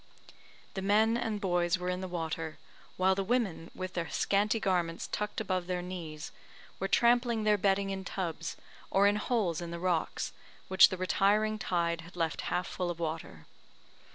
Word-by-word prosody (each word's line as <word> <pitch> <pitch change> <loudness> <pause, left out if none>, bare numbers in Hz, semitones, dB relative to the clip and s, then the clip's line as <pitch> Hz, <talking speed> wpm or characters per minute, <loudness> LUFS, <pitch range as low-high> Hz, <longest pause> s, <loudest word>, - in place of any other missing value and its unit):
The 190 - -3
men 215 +3 +4
and 220 -3 -1
boys 175 -2 +1
were 180 0 -4
in 180 0 -1
the 185 - -3
water, 165 -2 -3 0.4
while 185 +1 +4
the 195 +1 -1
women, 200 -7 0
with 185 0 -5
their 170 -2 -2
scanty 210 +3 +1
garments 175 -5 0
tucked 210 0 -2
above 185 -5 -1
their 180 -1 -2
knees, 165 -4 -6 0.5
were 195 - 0
trampling 235 +1 +3
their 210 0 +4
bedding 195 0 +1
in 190 0 -4
tubs, 170 -4 -4 0.3
or 195 +1 +4
in 205 +1 +4
holes 210 -7 0
in 170 - -5
the 170 - -5
rocks, 175 -2 -1 0.4
which 190 +1 +8
the 185 - -4
retiring 210 +4 +2
tide 170 -3 0
had 170 +2 -13
left 165 -2 -1
half 180 +1 0
full 180 0 -3
of 170 -1 -4
water. 160 - -4
185 Hz, 175 wpm, -31 LUFS, 170-205 Hz, 0.5 s, which